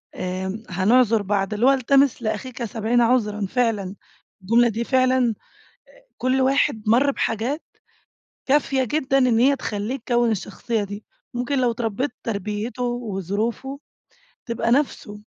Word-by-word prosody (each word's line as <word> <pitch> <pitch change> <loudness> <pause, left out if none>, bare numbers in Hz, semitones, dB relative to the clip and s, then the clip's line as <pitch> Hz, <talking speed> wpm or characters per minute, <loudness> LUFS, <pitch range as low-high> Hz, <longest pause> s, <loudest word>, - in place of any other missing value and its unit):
آآ 190 +4 -4
هنعذِر 220 +4 +3
بعض، 200 0 -1
اللي 220 +4 +1
هو 270 - +7
التمِس 275 0 +3
لأخيك 240 +2 -4
70 225 +2 0
عذرًا، 215 -4 +1
فعلًا، 210 -3 -1 0.5
الجملة 235 +5 +4
دي 225 +2 -2
فعلًا، 255 -2 +2 0.9
كل 255 +1 +1
واحد 260 -4 +2
مرَّ 250 +6 +4
بحاجات 250 +5 -2 0.8
كافية 270 -1 +2
جدًا 270 +1 +1
إن 250 -3 +3
هي 275 +3 +4
تخلِّيه 215 0 -3
يكوِّن 240 -2 +1
الشخصية 215 +2 -2
دي، 205 +2 -8 0.3
ممكن 250 +3 -1
لو 245 -1 +2
اتربِّيت 230 +3 -2
تربيته 210 +3 -4
وظروفه 235 +3 -3 0.7
تبقى 235 -1 -1
نفسه. 245 -6 0
235 Hz, 125 wpm, -23 LUFS, 210-255 Hz, 0.9 s, هو